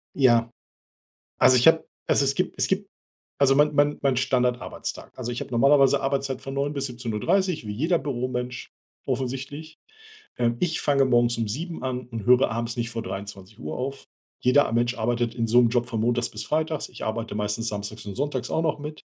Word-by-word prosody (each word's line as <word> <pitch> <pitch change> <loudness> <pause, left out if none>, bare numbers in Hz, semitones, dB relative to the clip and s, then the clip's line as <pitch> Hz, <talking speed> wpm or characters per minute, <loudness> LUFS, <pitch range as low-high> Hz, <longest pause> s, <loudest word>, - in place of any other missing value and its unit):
Ja. 120 -4 +4 0.9
Also, 130 0 +6
ich 125 - +4
habe 160 0 +5 0.2
also, 140 - +3
es 135 - +2
gibt 185 - -1
es - - +1
gibt 195 +1 -1 0.5
also, 135 -1 +5
mein 150 +1 +4
mein 145 +1 +3
mein 135 -3 +2
Standard-Arbeitstag. 125 -1 -2
Also, 120 -1 -4
ich 120 - -4
habe - - -7
normalerweise 135 +2 +4
Arbeitszeit 135 -1 -1
von 135 - -6
9:00 140 +2 -1
bis 140 -1 -2
17:30 125 - -1
wie - - -3
jeder 160 - +1
Büromensch 125 -2 -3 0.4
offensichtlich. 135 +4 -4 0.6
Ähm, 120 -1 +1
ich 170 -3 0
fange 140 -2 +3
morgens 120 -2 +2
um 115 - 0
7:00 165 - -5
an 125 -1 -3
und 115 -1 -6
höre 125 +1 +5
abends 115 +1 -3
nicht 115 0 -2
vor 115 -1 -4
23:00 95 -5 -7
auf. 135 +2 -4 0.4
Jeder 130 +2 +4
Mensch 120 +1 +1
arbeitet 120 +1 0
in 115 -1 0
so 120 +2 +5
'nem 120 - +4
Job 120 0 +1
von 115 -3 -3
Montags 120 +1 +1
bis 105 - -6
Freitags. 155 +1 -1
Ich - - -8
arbeite 110 0 -3
meistens 105 +2 -2
Samstags 105 +1 -5
und 100 - -6
Sonntags 140 -2 -2
auch 160 - +1
noch 155 -2 -1
mit. 150 +1 -7
125 Hz, 190 wpm, -25 LUFS, 115-140 Hz, 0.9 s, Also